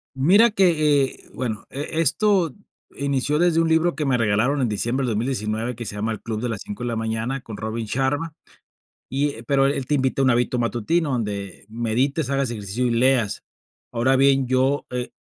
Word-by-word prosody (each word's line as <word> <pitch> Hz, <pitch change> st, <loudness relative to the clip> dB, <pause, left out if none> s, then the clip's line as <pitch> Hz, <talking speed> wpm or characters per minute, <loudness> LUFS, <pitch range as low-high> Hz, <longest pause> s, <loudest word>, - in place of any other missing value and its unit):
Mira 195 Hz, -, +5 dB
que, 155 Hz, -8 st, +3 dB
eh 130 Hz, -, -8 dB
bueno, 115 Hz, -4 st, -4 dB
e 150 Hz, +3 st, -3 dB
esto 170 Hz, 0 st, +2 dB, 0.4 s
inició 140 Hz, +1 st, 0 dB
desde 170 Hz, -1 st, +3 dB
un 165 Hz, -, +2 dB
libro 160 Hz, +1 st, +2 dB
que 150 Hz, +2 st, -2 dB
me 130 Hz, -3 st, +1 dB
regalaron 115 Hz, +6 st, +1 dB
en 125 Hz, -, +1 dB
diciembre 120 Hz, +6 st, -1 dB
del 115 Hz, -, -1 dB
2019, 115 Hz, 0 st, -2 dB
que 120 Hz, -, -6 dB
se 105 Hz, -, -6 dB
llama 105 Hz, +2 st, -2 dB
El 110 Hz, -, -4 dB
Club 110 Hz, -2 st, -4 dB
de 125 Hz, -, -1 dB
las 110 Hz, -3 st, -4 dB
5 105 Hz, +3 st, -7 dB
de 120 Hz, -, -2 dB
la 115 Hz, -, -2 dB
Mañana, 115 Hz, +4 st, -2 dB
con 110 Hz, -4 st, -8 dB
Robin 110 Hz, +1 st, -4 dB
Sharma, 140 Hz, +7 st, -1 dB, 0.8 s
y, 140 Hz, +2 st, 0 dB
eh, 115 Hz, -1 st, -11 dB
pero 135 Hz, +1 st, +3 dB
él 140 Hz, -1 st, -1 dB
te 150 Hz, -, +1 dB
invita 135 Hz, 0 st, 0 dB
a -, -, +3 dB
un -, -, +4 dB
hábito 125 Hz, +1 st, +1 dB
matutino 125 Hz, +7 st, 0 dB
donde 100 Hz, -6 st, -4 dB
medites, 120 Hz, +6 st, -1 dB
hagas 140 Hz, -2 st, 0 dB
ejercicio 105 Hz, +2 st, -3 dB
y 120 Hz, -, +1 dB
leas. 120 Hz, -2 st, +2 dB, 0.5 s
Ahora 125 Hz, +3 st, +2 dB
bien, 135 Hz, -1 st, +3 dB
yo, 130 Hz, +3 st, +1 dB
eh, 125 Hz, 0 st, -4 dB
130 Hz, 200 wpm, -23 LUFS, 115-145 Hz, 0.8 s, Mira